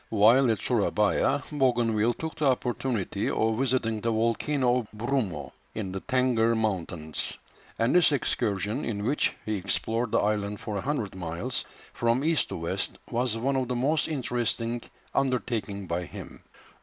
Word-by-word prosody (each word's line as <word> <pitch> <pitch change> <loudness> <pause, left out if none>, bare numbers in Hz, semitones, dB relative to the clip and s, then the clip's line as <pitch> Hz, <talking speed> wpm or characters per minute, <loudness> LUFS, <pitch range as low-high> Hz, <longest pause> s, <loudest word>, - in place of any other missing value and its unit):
While 115 +5 +5
at 110 - +2
Surabaya, 105 +5 +2
Bougainville 120 -5 +2
took 160 0 -4
the 150 -4 +2
opportunity 120 -5 -1
of 110 +1 +1
visiting 125 -4 +1
the 115 - 0
volcano 120 +3 +2
of 115 - -6
Brumo, 110 - -2 0.2
in 100 -4 -3
the 95 - -3
Tengger 125 -3 +2
Mountains; 85 -7 -2 0.4
and 115 +2 +2
this 175 -3 +6
excursion, 105 -6 0
in 105 -3 -2
which 145 +6 +1
he 110 -1 -1
explored 110 +4 -1
the - - +3
island 105 -1 0
for 105 - -5
a - - -2
hundred 135 -7 -2
miles, 85 -2 -3 0.3
from 120 +3 +1
east 160 0 +2
to - - -4
west, 85 0 -2
was 120 -1 0
one 135 +4 0
of 130 -2 0
the 125 - -1
most 145 +6 +2
interesting 120 -4 -1 0.3
undertaken 120 -7 -1
by 85 0 -2
him. - - -9
115 Hz, 155 wpm, -28 LUFS, 105-130 Hz, 0.4 s, this